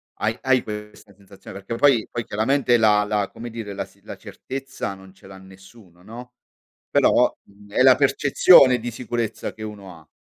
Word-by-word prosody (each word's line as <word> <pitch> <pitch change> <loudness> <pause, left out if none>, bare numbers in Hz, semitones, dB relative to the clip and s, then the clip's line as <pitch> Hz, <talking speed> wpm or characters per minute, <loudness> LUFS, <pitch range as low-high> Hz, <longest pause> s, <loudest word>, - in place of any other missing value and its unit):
Hai 110 +2 -2
hai 130 -2 +2
questa 105 -1 -10
sensazione? 100 0 -14
Perché 100 +4 -6
poi 120 -3 +2
poi 120 - -4
chiaramente 120 +4 +1
la 105 -2 +3
la, 105 -1 -2
come 120 +1 -9
dire, 110 -3 -7
la 100 - -4
s - - -25
la - - -9
certezza 135 -6 -7
non 95 -1 -15
ce 95 - -19
l'ha 95 - -12
nessuno, 95 -1 -18
no, 120 +4 -11 0.6
però, - - +2
mhmm, 100 0 -20
è 130 - +2
la 130 -1 +6
percezione 140 -1 +5
di 120 +2 -6
sicurezza 120 -2 -4
che 110 - -12
uno 100 -4 -10
ha. 80 - -21
110 Hz, 180 wpm, -22 LUFS, 100-125 Hz, 0.6 s, la